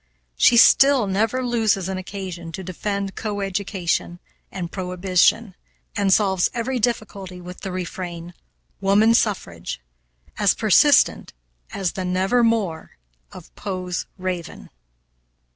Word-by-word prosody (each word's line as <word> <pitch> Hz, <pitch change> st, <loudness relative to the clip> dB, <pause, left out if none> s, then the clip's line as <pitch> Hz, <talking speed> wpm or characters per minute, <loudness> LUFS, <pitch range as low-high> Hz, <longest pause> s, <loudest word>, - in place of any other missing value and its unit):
She 235 Hz, -, +5 dB
still 270 Hz, +1 st, +6 dB
never 225 Hz, +6 st, 0 dB
loses 220 Hz, -6 st, +1 dB
an 190 Hz, -1 st, -3 dB
occasion 185 Hz, -3 st, -7 dB
to 190 Hz, -, -6 dB
defend 195 Hz, +2 st, -4 dB
co 210 Hz, -2 st, -4 dB
education 190 Hz, -3 st, -2 dB, 0.3 s
and 175 Hz, -3 st, -5 dB
prohibition, 185 Hz, +3 st, +1 dB, 0.4 s
and 200 Hz, -1 st, +1 dB
solves 190 Hz, -2 st, +3 dB
every 245 Hz, +2 st, -2 dB
difficulty 205 Hz, -6 st, -3 dB
with 180 Hz, +1 st, -10 dB
the 195 Hz, -, -5 dB
refrain, 175 Hz, -1 st, -6 dB, 0.5 s
"woman 200 Hz, +3 st, +4 dB
suffrage," 135 Hz, -, -1 dB, 0.6 s
as -, -, +3 dB
persistent -, -, +4 dB, 0.4 s
as 190 Hz, -3 st, -2 dB
the 190 Hz, -, -5 dB
"never 190 Hz, +7 st, +1 dB
more" 210 Hz, -8 st, -1 dB, 0.3 s
of -, -, -13 dB
Poe's 185 Hz, -3 st, -4 dB
raven. 180 Hz, -, -5 dB
190 Hz, 115 wpm, -22 LUFS, 180-215 Hz, 0.6 s, still